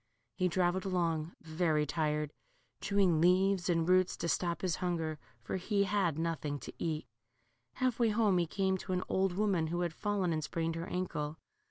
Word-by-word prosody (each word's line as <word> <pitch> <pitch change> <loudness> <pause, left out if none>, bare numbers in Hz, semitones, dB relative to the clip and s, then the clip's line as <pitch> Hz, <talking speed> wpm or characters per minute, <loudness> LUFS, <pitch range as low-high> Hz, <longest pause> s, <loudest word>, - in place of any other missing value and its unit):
He 185 -1 +1
travelled 180 +1 +1
along 170 -4 -1
very 160 -2 +1
tired, 150 -1 -1 0.5
chewing 190 -6 +3
leaves 185 +1 +3
and 165 -1 +2
roots 185 0 +3
to - - -2
stop 170 +1 0
his 180 -3 0
hunger, 165 -4 -2 0.2
for 115 - -2
he 200 +2 +1
had 190 -6 +1
nothing 160 -3 -2
to - - -8
eat. 155 -2 -2 0.7
Half 255 -2 0
way 235 -2 +4
home 210 -4 +3
he 170 - +1
came 190 +2 0
to 185 - -4
an 180 - 0
old 190 -1 +1
woman 190 -4 +1
who 175 +2 -2
had 170 -2 -1
fallen 200 -4 0
and 155 -1 -1
sprained 165 +2 -2
her 165 +1 -4
ankle. 155 -4 -3
175 Hz, 180 wpm, -33 LUFS, 160-190 Hz, 0.7 s, way